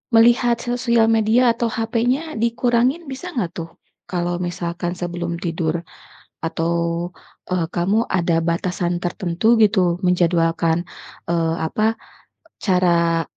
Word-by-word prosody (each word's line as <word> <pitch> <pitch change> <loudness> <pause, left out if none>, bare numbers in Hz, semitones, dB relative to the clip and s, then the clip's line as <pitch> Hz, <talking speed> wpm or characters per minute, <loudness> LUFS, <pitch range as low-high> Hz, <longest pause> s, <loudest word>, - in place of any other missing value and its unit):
Melihat 235 +1 +5
sosial 235 -1 +1
media 225 +2 +3
atau 235 0 -1
HP-nya 240 +8 -1
dikurangin 240 +6 +1
bisa 275 +7 -7
enggak 230 - -2
tuh, 165 -1 -6 0.4
kalau 175 -1 -2
misalkan 175 0 -3
sebelum 175 -1 -3
tidur, 170 -1 -2 0.6
atau, 165 +1 -1 0.8
eee, 180 -2 0
kamu 200 +6 +1
ada 170 -2 +2
batasan 175 +1 -1
tertentu 180 +5 +1
gitu 195 -5 +3
menjadwalkan, 170 -1 +2 0.5
eee, 165 -1 +1
apa 215 +8 0 0.6
cara 170 -3 +2
180 Hz, 110 wpm, -21 LUFS, 170-230 Hz, 0.8 s, Melihat